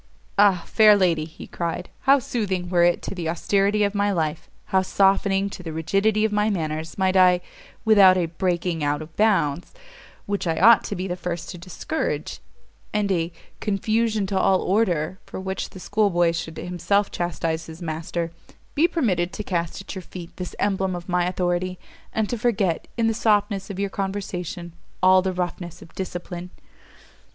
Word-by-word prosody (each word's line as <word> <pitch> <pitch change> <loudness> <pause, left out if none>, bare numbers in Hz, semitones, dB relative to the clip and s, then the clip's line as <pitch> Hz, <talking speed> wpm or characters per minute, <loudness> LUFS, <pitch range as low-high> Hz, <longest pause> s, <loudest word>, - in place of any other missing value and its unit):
"Ah, 195 -4 +5
fair 215 -2 +6
lady," 170 -6 +2
he 160 - -11
cried, 170 +1 -4 0.2
"how 275 - +8
soothing 195 -8 -2
were 175 -1 +3
it 175 0 +2
to - - -4
the 170 -4 -3
austerity 200 +4 +1
of 200 0 +1
my 205 0 +1
life, 160 -4 -2 0.2
how 190 - +5
softening 195 +1 +2
to 190 - -8
the 165 -2 -6
rigidity 195 +7 +1
of 220 - 0
my 210 +1 +2
manners, 160 -4 -3
might 190 -1 +1
I 180 -1 +6 0.5
without 200 -4 +7
a 175 - +1
breaking 175 -1 -1
out 145 +1 0
of 155 +1 -15
bounds, 190 - +1 0.5
which 200 -2 -2
I 165 - 0
ought 225 +2 +7
to - - -3
be 185 +2 -3
the 180 - -2
first 175 -1 -5
to 180 - -9
discourage, 185 - -3 0.5
and 210 -2 0
a 170 -2 0 0.3
"confusion 215 +1 0
to 190 0 -1
all 190 -1 +3
order" 185 -4 +1
for - - -6
which 190 0 -4
the 190 - -11
school 205 +2 +1
boy 175 -2 +3
should 165 -1 -5
himself 180 +3 0
chastise 165 -1 -2
his 160 0 -10
master 165 0 -3 0.4
be 315 +4 +4
permitted 190 - 0
to 210 - -4
cast 170 -2 -2
at - - -8
your 190 - -6
feet 175 -1 -10
this 180 -1 -6
emblem 190 -2 0
of 175 +1 -8
my 180 0 +2
authority! 180 0 -1 0.3
and 220 -1 0
to 240 - -2
forget, 205 -8 0
in 230 - +2
the 225 - +2
softness 205 -3 +1
of 195 - -6
your 200 0 -2
conversation, 185 -3 -4 0.3
all 185 0 +7
the 190 0 -1
roughness 175 -1 -4
of - - -17
discipline!" 180 -1 -6
185 Hz, 180 wpm, -24 LUFS, 175-205 Hz, 0.5 s, how